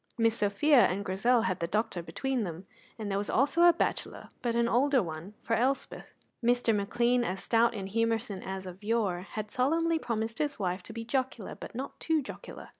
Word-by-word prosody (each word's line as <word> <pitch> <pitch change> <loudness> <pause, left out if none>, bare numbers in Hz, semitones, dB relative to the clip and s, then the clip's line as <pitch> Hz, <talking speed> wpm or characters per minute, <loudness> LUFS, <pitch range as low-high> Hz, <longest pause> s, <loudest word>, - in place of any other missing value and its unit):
Miss 230 -1 +3
Sophia 235 +6 +4
and 200 +3 -3
Grizel 225 +6 +2
had 185 -6 -1
the 170 - -1
doctor 210 -1 -1
between 260 +7 -2
them, 175 0 -6 0.3
and 215 -3 -4
there 195 - +1
was 205 - -3
also 285 +6 +2
a 345 - +9
bachelor, 335 - -3
but 235 -2 -1
an 235 0 +3
older 260 +1 +3
one, 165 +4 -7
for 230 - -1
Elspeth. 260 +4 0 0.4
Mr. 240 -1 +3
McLean, 240 +4 +2
as 195 -4 -3
stout 230 0 +3
and 195 -2 -4
humoursome 225 -2 0
as 190 0 -5
of 185 +2 -9
yore, 205 -5 0
had 215 -1 -4
solemnly 325 +5 +2
promised 225 -4 -3
his 295 -1 -1
wife 185 -1 -2
to 200 - -11
be 230 0 -6
jocular 255 -3 -2
but - - -10
not 265 +3 -6
too 320 -1 +1
jocular. - - -9
230 Hz, 195 wpm, -30 LUFS, 200-250 Hz, 0.4 s, a